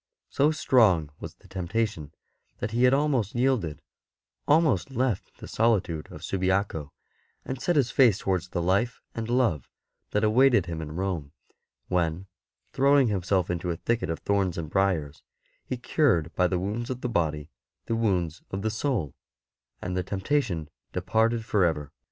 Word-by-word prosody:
So 145 Hz, +2 st, +3 dB
strong 105 Hz, -, +3 dB
was -, -, -8 dB
the -, -, -20 dB
temptation 95 Hz, -4 st, -2 dB, 0.5 s
that 105 Hz, -, -3 dB
he 120 Hz, +2 st, +3 dB
had 125 Hz, -, +5 dB
almost 135 Hz, -8 st, 0 dB
yielded 120 Hz, -, 0 dB, 0.3 s
— -, -, -55 dB
almost 150 Hz, -, +3 dB
left 125 Hz, -5 st, -2 dB
the -, -, -9 dB
solitude 100 Hz, -9 st, 0 dB
of 75 Hz, -, -10 dB
Subiaco 95 Hz, -5 st, -1 dB, 0.5 s
and 130 Hz, 0 st, -5 dB
set 175 Hz, -, +1 dB
his 135 Hz, -5 st, +2 dB
face 120 Hz, -8 st, +5 dB
towards 90 Hz, -2 st, -1 dB
the 85 Hz, -, -2 dB
life 100 Hz, +7 st, +1 dB
and 115 Hz, 0 st, -4 dB
love 120 Hz, -, +1 dB, 0.4 s
that 105 Hz, -, 0 dB
awaited 120 Hz, -2 st, +4 dB
him 85 Hz, -1 st, -5 dB
in 75 Hz, -1 st, -6 dB
Rome, 85 Hz, -6 st, -3 dB, 0.5 s
when, 85 Hz, 0 st, 0 dB, 0.5 s
throwing 140 Hz, -2 st, +4 dB
himself 95 Hz, -2 st, 0 dB
into 90 Hz, 0 st, -3 dB
a 85 Hz, -, -2 dB
thicket 115 Hz, +1 st, -1 dB
of 80 Hz, -, -1 dB
thorns 100 Hz, -3 st, 0 dB
and 80 Hz, -2 st, -5 dB
briers, 90 Hz, -7 st, 0 dB, 0.4 s
he 130 Hz, -, -4 dB
cured 115 Hz, -, +1 dB
by 90 Hz, -, +3 dB
the 90 Hz, -, 0 dB
wounds 105 Hz, +6 st, -3 dB
of 130 Hz, -1 st, -4 dB
the -, -, -1 dB
body 80 Hz, -8 st, -1 dB, 0.3 s
the 115 Hz, -, -1 dB
wounds 90 Hz, -8 st, 0 dB
of 95 Hz, +1 st, -4 dB
the 110 Hz, -, 0 dB
soul, 110 Hz, -, -1 dB, 0.7 s
and 90 Hz, 0 st, -3 dB
the 90 Hz, -, +1 dB
temptation 95 Hz, -, -1 dB, 0.3 s
departed 115 Hz, 0 st, +1 dB
for 105 Hz, -4 st, +2 dB
ever. 75 Hz, -4 st, 0 dB
100 Hz, 165 wpm, -27 LUFS, 85-120 Hz, 0.7 s, had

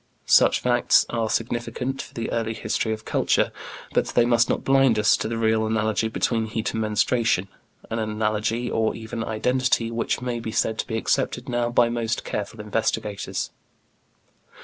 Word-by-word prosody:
Such -, -, +5 dB
facts 120 Hz, -1 st, +3 dB
are 115 Hz, -2 st, -1 dB
significant 120 Hz, +4 st, -2 dB
for -, -, -13 dB
the 115 Hz, -, -3 dB
early 115 Hz, -1 st, -1 dB
history 110 Hz, -, -1 dB
of 110 Hz, 0 st, -5 dB
culture, -, -, +1 dB, 0.4 s
but -, -, +2 dB
they 120 Hz, -, +3 dB
must 120 Hz, -1 st, +3 dB
not -, -, 0 dB
blind 135 Hz, -4 st, +4 dB
us 105 Hz, -1 st, +4 dB
to -, -, -3 dB
the 115 Hz, +1 st, -3 dB
real 110 Hz, -1 st, +2 dB
analogy 110 Hz, 0 st, 0 dB
between 110 Hz, 0 st, 0 dB
heat 110 Hz, +2 st, -2 dB
and 110 Hz, -, -2 dB
menstruation, 110 Hz, -2 st, +1 dB, 0.4 s
an 115 Hz, -, -1 dB
analogy 110 Hz, +2 st, -1 dB
or 110 Hz, -2 st, 0 dB
even 115 Hz, 0 st, -5 dB
identity 115 Hz, +1 st, 0 dB
which 115 Hz, 0 st, -1 dB
may 125 Hz, -1 st, -3 dB
be 115 Hz, -1 st, -5 dB
said 110 Hz, 0 st, 0 dB
to -, -, -2 dB
be 110 Hz, -, -2 dB
accepted 120 Hz, +3 st, -1 dB
now 120 Hz, -1 st, 0 dB
by 120 Hz, 0 st, +4 dB
most 115 Hz, -1 st, -2 dB
careful 105 Hz, +2 st, -4 dB
investigators. 105 Hz, -1 st, -2 dB
115 Hz, 170 wpm, -24 LUFS, 110-120 Hz, 0.4 s, Such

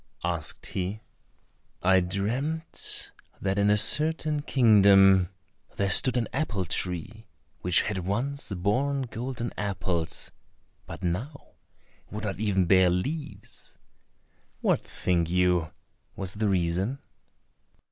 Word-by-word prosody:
asked -, -, -3 dB
he. 95 Hz, +3 st, -4 dB, 0.8 s
"I 95 Hz, +1 st, +5 dB
dreamt 120 Hz, -, -2 dB, 0.3 s
that 95 Hz, +1 st, -1 dB
in 100 Hz, 0 st, +3 dB
a 105 Hz, -, +4 dB
certain 155 Hz, +4 st, +4 dB
kingdom 100 Hz, -, +5 dB, 0.5 s
there 100 Hz, -1 st, +1 dB
stood 125 Hz, +6 st, +6 dB
an 115 Hz, -, 0 dB
apple 105 Hz, -, -2 dB
tree 90 Hz, +5 st, -3 dB, 0.3 s
which 90 Hz, 0 st, +2 dB
had 105 Hz, -3 st, -3 dB
once 120 Hz, +10 st, -2 dB
borne 125 Hz, +10 st, 0 dB
golden 120 Hz, 0 st, -5 dB
apples, 95 Hz, -5 st, -2 dB, 0.6 s
but -, -, -9 dB
now 115 Hz, -, -4 dB, 0.6 s
would 105 Hz, +1 st, -7 dB
not 95 Hz, -2 st, -4 dB
even 100 Hz, -4 st, +1 dB
bear 95 Hz, 0 st, +5 dB
leaves. 145 Hz, -, -5 dB, 0.8 s
What, -, -, +1 dB
think 85 Hz, -2 st, -1 dB
you, 90 Hz, -2 st, +1 dB, 0.4 s
was 95 Hz, -1 st, -5 dB
the 105 Hz, 0 st, -1 dB
reason?" 95 Hz, +6 st, 0 dB
100 Hz, 110 wpm, -27 LUFS, 90-125 Hz, 0.8 s, stood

